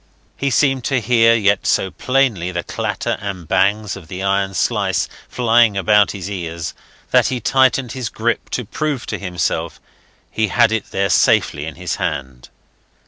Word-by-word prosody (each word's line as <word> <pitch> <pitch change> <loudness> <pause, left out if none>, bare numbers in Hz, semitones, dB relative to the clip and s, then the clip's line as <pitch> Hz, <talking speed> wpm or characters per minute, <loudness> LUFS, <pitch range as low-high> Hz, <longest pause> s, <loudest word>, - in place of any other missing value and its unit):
He 140 - -1
seemed 135 0 +2
to 135 -2 +1
hear 115 0 +4
yet 100 -3 +1
so 95 - +1
plainly 125 -10 0
the 85 -1 -3
clatter - - -3
and 95 -5 -6
bangs 100 +3 +1
of 95 -5 -11
the 90 +2 -6
iron 100 0 0
slice - - 0 0.2
flying 115 -3 +3
about 105 +1 +4
his 95 -3 -6
ears 85 -5 -5 0.4
that - - +4
he 130 - -2
tightened 130 0 +2
his 125 -2 -4
grip 120 +2 -2
to 125 - -3
prove 145 +3 -3
to - - -4
himself 90 -3 -2 0.5
he 110 -1 0
had 105 - +3
it 110 -2 -2
there 100 -1 0
safely - - +2
in - - -7
his - - -4
hand. 65 -2 -4
105 Hz, 165 wpm, -19 LUFS, 95-120 Hz, 0.5 s, hear